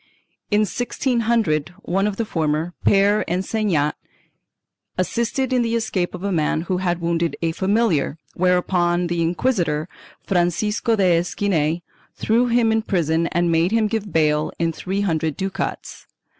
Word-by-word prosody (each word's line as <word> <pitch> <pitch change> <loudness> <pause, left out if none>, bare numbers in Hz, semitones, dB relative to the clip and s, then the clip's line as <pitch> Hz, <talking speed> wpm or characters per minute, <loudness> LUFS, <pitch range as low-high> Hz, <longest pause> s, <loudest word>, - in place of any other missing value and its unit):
In 210 0 +3
1600, 225 - 0
one 195 +3 0
of 210 - -2
the 230 - -2
former, 160 -1 -1
Pere 200 +1 +4
Ensenat, 180 -5 0 1.0
assisted 235 +7 -1
in 250 - +3
the 230 0 0
escape 190 -6 -1
of 180 - -9
a 200 - -1
man 155 -2 +1
who 180 +2 -2
had 175 -1 -1
wounded 170 0 0
a 165 - +1
familiar, 190 -5 +1 0.2
whereupon 180 -1 +1
the 170 -1 -1
inquisitor, 170 -4 0 0.4
Francisco 200 +5 +1
de 180 -5 +3
Esquinel, 170 -3 0 0.3
threw 235 +3 +2
him 235 -1 +3
in 220 0 +2
prison 170 -5 0
and 175 0 0
made 165 +2 +3
him 225 -1 +2
give 210 -2 -2
bail 150 -1 +2
in 165 -1 0
three 190 +5 -3
hundred 160 -6 -1
ducats. 195 0 -4
180 Hz, 145 wpm, -21 LUFS, 165-215 Hz, 1.0 s, Pere